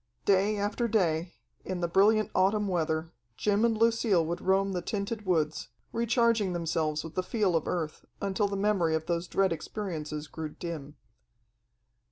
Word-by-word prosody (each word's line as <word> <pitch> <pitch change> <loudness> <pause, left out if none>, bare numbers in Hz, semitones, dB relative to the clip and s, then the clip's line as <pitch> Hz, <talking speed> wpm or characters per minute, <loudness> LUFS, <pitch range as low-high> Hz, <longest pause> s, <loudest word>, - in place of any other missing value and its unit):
Day 200 +2 +3
after 205 +4 0
day, 175 -6 +1 0.3
in 185 -1 -4
the 170 - 0
brilliant 210 +5 +3
autumn 200 +2 +2
weather, 160 -2 -1 0.3
Jim 210 +1 +2
and 230 -2 +3
Lucille 225 -6 +3
would 170 +2 -3
roam 195 +1 +2
the 180 -2 -2
tinted 205 +2 -3
woods, 155 -4 0 0.3
recharging 230 -4 +2
themselves 160 -3 -1
with 160 - -8
the 185 - 0
feel 195 -2 0
of 160 - 0
Earth, 160 -3 -3 0.2
until 200 +1 0
the 200 - -3
memory 195 -5 +2
of 160 0 -2
those 170 0 -1
dread 190 -1 +2
experiences 155 -4 -5
grew 160 -1 -5
dim. 150 -3 -7
185 Hz, 160 wpm, -29 LUFS, 165-210 Hz, 0.3 s, Day